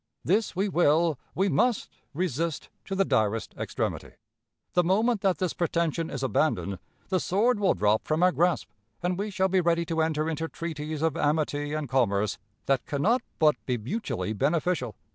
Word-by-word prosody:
This 205 +2 +1
we 195 +3 +1
will, 165 -4 +3 0.2
we 190 +2 +2
must, 245 +3 +2 0.3
resist 165 -2 -2 0.2
to 195 - -3
the 195 0 +2
direst 110 - 0
extremity. - - -3 0.6
The 180 - +4
moment 210 +5 +2
that 190 -2 +2
this 185 -3 -1
pretension 170 -1 -1
is 135 -1 -4
abandoned, 105 - 0 0.3
the 185 -1 +2
sword 210 +7 +2
will 200 -2 +3
drop 105 +1 +1
from 155 +3 +1
our 180 - +6
grasp, 175 0 +1 0.4
and 180 +1 +1
we 200 +3 -3
shall 190 -1 +1
be 190 0 +2
ready 170 0 +1
to 165 -1 0
enter 155 -1 0
into 160 0 -2
treaties 155 -2 -5
of 160 -2 +1
amity 145 -1 0
and 155 -2 -3
commerce 110 -5 +1 0.3
that 135 -2 +1
can 140 -1 -2
not 240 +4 +3 0.2
but 155 -2 +3
be 125 -2 +1
mutually 120 - -3
beneficial. 145 - 0
165 Hz, 175 wpm, -27 LUFS, 145-185 Hz, 0.6 s, our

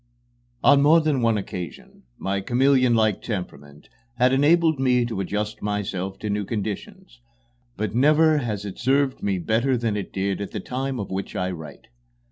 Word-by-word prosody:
XXX 120 0 -42
On 140 0 +6
more 155 +4 +6
than 155 -5 0
one 115 -2 +2
occasion 90 -6 -7 0.2
my 100 +1 -2
chameleonlike 120 -3 +2
temperament 75 -9 -7 0.3
has 125 +1 +3
enabled 160 +2 +3
me 125 -2 +2
to 115 -5 -4
adjust 105 +2 -3
myself 95 -2 -3
to 105 - -5
new 105 0 -1
conditions, 120 - -6 0.6
but 105 -1 -2
never 150 +5 +4
has 105 -6 -4
it 100 - -7
served 135 +1 +1
me 100 -2 0
better 115 +8 +1
than 115 -3 -1
it 100 - -4
did 95 +1 -2
at 100 - -6
the - - -3
time 130 0 -4
of 100 - -5
which 95 +1 -4
I 90 0 -1
write. 80 -3 -9
115 Hz, 170 wpm, -23 LUFS, 100-135 Hz, 0.6 s, On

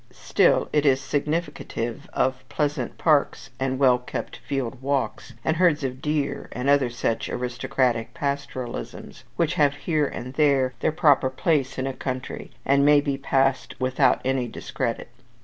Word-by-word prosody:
Still - - +2
it 150 -1 +3
is 135 -3 +4
significative 145 -4 -3
of 130 0 0
pleasant 145 -5 -2
parks, 150 -4 +1
and 130 0 -1
well 130 -2 +4
kept 125 - -6
field 135 -3 -4
walks, 140 0 -2
and 160 0 +1
herds 170 -4 +3
of 130 0 -4
deer, 150 -2 -2
and 125 +2 -3
other 140 -3 +4
such 120 -1 -2
aristocratic 125 -1 -1
pastoralisms, 140 -5 -5
which 170 0 +1
have 145 -5 +3
here 150 0 0
and 125 0 -7
there 140 -3 +3
their - - +1
proper 145 -4 +4
place 135 0 0
in 130 - -1
a 135 - -2
country, 130 -1 -5 0.2
and 140 +1 +4
may 145 0 +6
be 140 -1 -1
passed 135 -2 0
without 130 0 +2
any 130 -2 0
discredit. 115 0 -4
135 Hz, 150 wpm, -24 LUFS, 130-145 Hz, 0.2 s, may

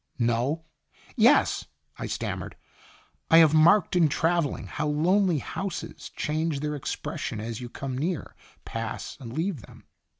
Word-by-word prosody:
"No 125 +7 0 0.5
yes," - - +4 0.3
I - - -3
stammered. - - -4 0.4
" - - -32
I 165 - +7
have 160 -2 +7
marked 165 +4 +5
in 170 -4 +5
traveling 165 -1 0
how 150 0 -3
lonely 175 +4 +3
houses 190 +6 -5
change 155 -1 -1
their 150 0 -2
expression 135 -5 -4
as 115 +2 -5
you 120 - -6
come 135 +1 -5
near, 160 +4 -3 0.3
pass, 115 0 -5
and 120 -4 -8
leave 160 - -2
them. - - -16
150 Hz, 140 wpm, -27 LUFS, 130-165 Hz, 0.5 s, I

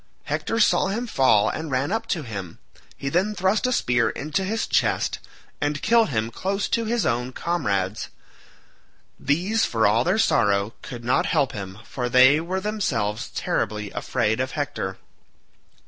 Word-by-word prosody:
Hector 225 - -2
saw 215 - +4
him 220 +5 -2
fall 115 - +3
and 160 0 -4
ran 135 +4 0
up 225 - -2
to 165 - -1
him; 95 - -7 0.4
he 140 - -5
then 185 +9 +1
thrust 195 +6 +1
a - - 0
spear 125 - +2
into 150 +6 -2
his 220 +4 -1
chest, - - +1 0.4
and 145 0 -1
killed 230 -1 +4
him 110 -3 -1
close 195 - -2
to 230 -1 0
his 230 0 0
own 125 +1 0
comrades. 105 - -1 1.1
These, 185 +10 +1
for 115 -2 +1
all 110 +4 +4
their 180 +5 +1
sorrow, 105 - +2
could 120 -1 -8
not 125 - +2
help 145 -6 +1
him 100 -5 -7
for 125 0 -4
they 130 +4 +6
were 185 +3 -2
themselves 130 - -2
terribly 105 -1 -2
afraid 110 -3 -1
of 130 +1 -2
Hector. 145 -10 -3
140 Hz, 160 wpm, -24 LUFS, -, 1.1 s, they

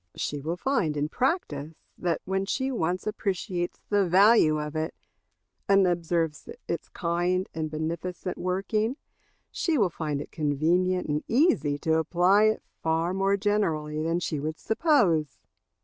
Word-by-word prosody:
She 145 -1 -3
will 165 +5 -3
find 180 - 0
in 145 +1 -1
practice 160 - -1 0.2
that 175 -2 -1
when 190 +1 -1
she 265 +4 -1
once 180 -6 -1
appreciates 190 -4 -2
the 205 -1 +3
value 190 -4 +5
of 150 0 -5
it, 155 0 -2 0.7
and 195 -1 +5
observes 170 -3 -1 0.2
its - - -4
kind 175 +2 -1
and 160 -1 -3
beneficent 170 +4 -4
working, 210 +7 -1 0.5
she 330 -3 0
will 200 -7 +2
find 150 -3 -3
it 145 - -8
convenient 170 +5 +1
and 150 0 -1
easy 235 - +2
to 160 +2 +1
apply 180 +6 +3
it 215 0 +1 0.2
far 165 +2 0
more 195 +1 +2
generally 165 -8 0
than 165 +2 0
she 155 -4 -2
would 155 +2 -3
suppose. 215 - +2
175 Hz, 145 wpm, -27 LUFS, 155-200 Hz, 0.7 s, value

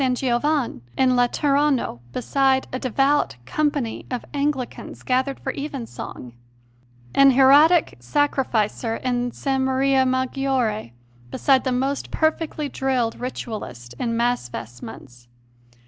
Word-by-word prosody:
Giovanne 255 - 0 0.2
in 255 -1 +3
Laterano 275 - +1
beside 265 - +1
a 255 - -2
devout 270 - +1
company 290 - -1
of 250 -2 -4
Anglicans 285 -3 -3
gathered 260 +2 0
for - - -4
Evensong; 265 - -7 0.8
an 275 0 +7
hieratic 290 - +5
sacrificer 225 - 0
in 245 0 -1
S. 245 - -10
Maria 265 0 +2
Maggiore 260 - -1 0.4
beside 265 - +2
the 260 - +1
most 270 +3 -1
perfectly 315 -1 -1
drilled 260 -4 -1
Ritualist 210 - -6
in 230 -2 -1
Mass 240 - 0
vestments! 120 +1 -10
260 Hz, 105 wpm, -23 LUFS, 235-275 Hz, 0.8 s, an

